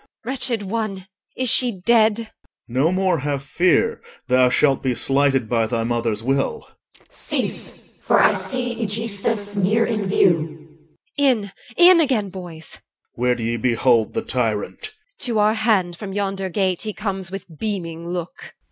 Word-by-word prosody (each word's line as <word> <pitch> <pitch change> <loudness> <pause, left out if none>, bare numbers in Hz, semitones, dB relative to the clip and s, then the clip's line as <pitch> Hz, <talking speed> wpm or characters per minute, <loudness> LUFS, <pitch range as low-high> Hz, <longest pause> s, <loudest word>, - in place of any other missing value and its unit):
Wretched 245 -3 -1
one, 200 -2 -3 0.3
is 255 - 0
she 240 -4 +4
dead? 225 +2 +3
OR. 225 - -9 0.4
No 130 +7 +1
more 185 -3 +1
have 140 0 -3
fear 175 - +1 0.2
Thou 125 0 +4
shalt 135 +1 +2
be 130 -2 -1
slighted 135 -3 +2
by 115 -1 +1
thy 115 0 -1
mother's 115 -2 -1
will. 135 - -1 0.4
CH. - - -37
Cease, - - -4
for - - +3
I - - +5
see 245 -2 -3
Aegisthus 210 -1 -2
near 210 +4 +2
in 215 -4 -2
view. 165 -5 0 0.4
EL. - - +2
In, 215 -6 +1 0.3
in 350 0 +8
again, 245 - +1
boys! 175 -4 -10
OR. - - -24 0.4
Where 125 0 +2
do 115 - -6
ye 115 +1 -1
behold 120 -1 +2
The - - -1
tyrant? 115 - -2
EL. - - -6 0.3
To 240 -5 -2
our 210 +1 +3
hand 215 -6 +1
from 195 0 -7
yonder 195 -1 -2
gate 185 -1 0
He 215 -1 -4
comes 195 -4 -4
with 195 -1 -7
beaming 170 -6 -4
look. 175 -1 -6
190 Hz, 165 wpm, -21 LUFS, 135-220 Hz, 0.4 s, in